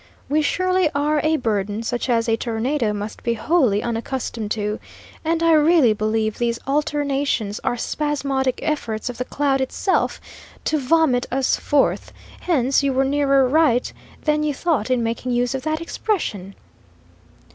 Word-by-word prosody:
We 300 Hz, +2 st, +2 dB
surely 370 Hz, +2 st, +1 dB
are 295 Hz, +1 st, +1 dB
a 315 Hz, +1 st, +2 dB
burden 210 Hz, -3 st, -1 dB
such 240 Hz, +2 st, -2 dB
as 230 Hz, -1 st, +2 dB
a 225 Hz, -, +3 dB
tornado 230 Hz, +1 st, -1 dB
must 205 Hz, +1 st, -5 dB
be 235 Hz, -1 st, 0 dB
wholly 240 Hz, -, +2 dB
unaccustomed 235 Hz, -1 st, -3 dB
to, 210 Hz, 0 st, -2 dB, 0.4 s
and 330 Hz, +1 st, 0 dB
I 330 Hz, -, +4 dB
really 305 Hz, -6 st, +5 dB
believe 215 Hz, 0 st, -1 dB
these 235 Hz, -1 st, 0 dB
alternations 280 Hz, -6 st, -1 dB
are 245 Hz, -, 0 dB
spasmodic 275 Hz, -2 st, -1 dB
efforts 235 Hz, -8 st, -2 dB
of 245 Hz, -, -13 dB
the 250 Hz, -, -2 dB
cloud 275 Hz, -1 st, 0 dB
itself 320 Hz, +8 st, 0 dB, 0.5 s
to 310 Hz, -, +1 dB
vomit 275 Hz, -2 st, +2 dB
us 265 Hz, 0 st, +2 dB
forth; 290 Hz, -2 st, 0 dB, 0.3 s
hence 275 Hz, -6 st, +2 dB
you 280 Hz, -1 st, 0 dB
were 265 Hz, +1 st, +2 dB
nearer 275 Hz, -1 st, +3 dB
right 275 Hz, -3 st, +2 dB, 0.3 s
than 300 Hz, 0 st, +1 dB
you 300 Hz, -2 st, -1 dB
thought 295 Hz, -9 st, 0 dB
in 250 Hz, -2 st, +1 dB
making 235 Hz, +2 st, -2 dB
use 245 Hz, +1 st, +1 dB
of 265 Hz, -, -3 dB
that 310 Hz, +2 st, -1 dB
expression." 215 Hz, -, -3 dB
265 Hz, 155 wpm, -21 LUFS, 230-300 Hz, 0.5 s, really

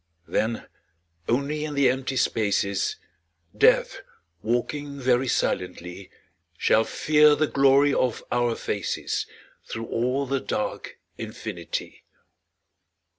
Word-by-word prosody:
Then 115 Hz, +1 st, -1 dB, 0.6 s
only 140 Hz, +5 st, 0 dB
in 150 Hz, -1 st, -4 dB
the 140 Hz, -1 st, +4 dB
empty 130 Hz, 0 st, -3 dB
spaces, 100 Hz, -4 st, +1 dB, 0.6 s
Death, -, -, +3 dB, 0.4 s
walking 140 Hz, +6 st, -2 dB
very 130 Hz, 0 st, +2 dB
silently, 90 Hz, -3 st, -2 dB, 0.5 s
Shall 110 Hz, -, +3 dB
fear 150 Hz, -1 st, +4 dB
the 155 Hz, -, +2 dB
glory 140 Hz, 0 st, +4 dB
of 125 Hz, -3 st, 0 dB
our 120 Hz, -1 st, +1 dB
faces -, -, -3 dB, 0.4 s
Through 115 Hz, -, -6 dB
all 125 Hz, +5 st, -1 dB
the 135 Hz, +1 st, -1 dB
dark 260 Hz, -, -4 dB, 0.2 s
infinity. -, -, -6 dB
130 Hz, 100 wpm, -25 LUFS, 115-140 Hz, 0.6 s, the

